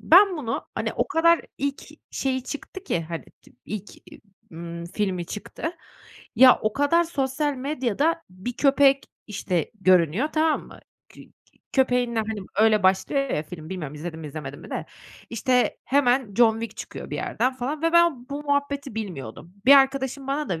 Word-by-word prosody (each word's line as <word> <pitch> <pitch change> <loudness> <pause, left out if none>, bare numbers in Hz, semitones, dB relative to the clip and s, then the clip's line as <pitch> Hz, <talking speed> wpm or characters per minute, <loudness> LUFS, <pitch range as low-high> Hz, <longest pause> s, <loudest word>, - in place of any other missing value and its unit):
Ben 370 +1 +6
bunu, 235 -6 -3
hani, - - -2
o - - -1
kadar 335 -1 +4 0.2
ilk 280 0 -2 0.3
şeyi 260 -1 -1
çıktı 370 +8 -7
ki, 170 - 0
hani, 165 -1 -5 0.2
tı - - -20
ilk 210 -1 -7 0.2
e - - -13 0.3
ımm, 170 +1 -7
filmi 185 -2 -2
çıktı. 215 - -5 0.6
Ya, 255 +1 +8
o 215 - +1
kadar 285 +6 +3
sosyal 290 -1 -1
medyada 285 - -1
bir 185 +7 -6
köpek 275 +1 +4 0.2
işte 185 -6 -2
görünüyor, 185 - +3
tamam 315 0 +1
mı? - - -14 0.3
Kü - - -14
k - - -24 0.4
köpeğinle, 250 -3 +2
hani, 215 -1 -4 0.2
öyle 215 -2 +4
başlıyor 195 +9 +2
ya 150 - 0
film, 160 -1 -10
bilmiyorum, 155 -6 -5
izledin 160 +1 -6
mi 155 - -7
izlemedin 145 -1 -7
mi - - -12
de, - - -4 0.4
işte, 250 +2 +1
hemen 255 -5 +2
John 230 -1 +5
Wick 230 - -6
çıkıyor - - -8
bir - - -3
yerden 255 +1 -1
falan 275 +5 -4
ve 330 0 +2
ben 340 -8 +3
bu 285 +1 -5
muhabbeti 285 -3 -1
bilmiyordum. 175 - -6
Bir 275 - +9
arkadaşım 270 0 +2
bana 290 +2 -2
da 170 -3 -2
250 Hz, 170 wpm, -24 LUFS, 190-285 Hz, 0.6 s, Bir